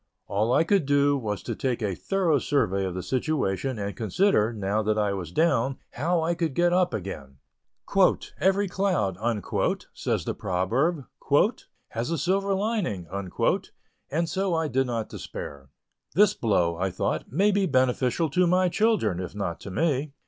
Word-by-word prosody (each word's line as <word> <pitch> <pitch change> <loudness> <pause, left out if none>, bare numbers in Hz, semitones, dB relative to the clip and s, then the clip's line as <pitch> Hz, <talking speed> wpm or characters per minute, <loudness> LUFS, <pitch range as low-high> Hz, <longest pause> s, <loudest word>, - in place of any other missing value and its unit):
All 105 +4 0
I 145 - +4
could 175 -3 +2
do 145 0 +3
was 105 -6 -3
to - - -3
take 125 -3 -2
a 100 -2 0
thorough 175 - +1
survey 100 -9 +1
of 90 -1 -4
the 90 - -4
situation, 130 -3 -1
and 100 -1 -4
consider, 115 - +2
now 105 -1 -1
that 110 0 0
I 105 -2 +1
was 90 -4 -5
down, 135 - +2
how 165 +5 0
I 170 +2 +1
could 165 -5 -2
get 175 0 +3
up 180 0 +3
again. 70 -9 -6 1.0
"Every 195 +1 +2
cloud," 180 - 0 0.8
says - - -2
the - - -1
proverb, 115 - 0 0.8
"has 115 +5 -3
a 165 - 0
silver 195 +5 +1
lining," 195 - -1 1.0
and 165 +4 0
so 185 +2 0
I 160 -1 0
did 130 -1 0
not 115 -3 -2
despair. 70 -2 -8 0.5
"This 205 +1 +5
blow," 90 - +1
I 95 +2 0
thought 100 +4 -2
"may 195 +9 +3
be 200 -1 +2
beneficial 130 +3 +2
to 180 +3 +3
my 180 +1 +3
children, 205 - +1
if 90 +1 -6
not 100 -4 -3
to - - -8
me." 140 - 0
135 Hz, 165 wpm, -26 LUFS, -, 1.0 s, This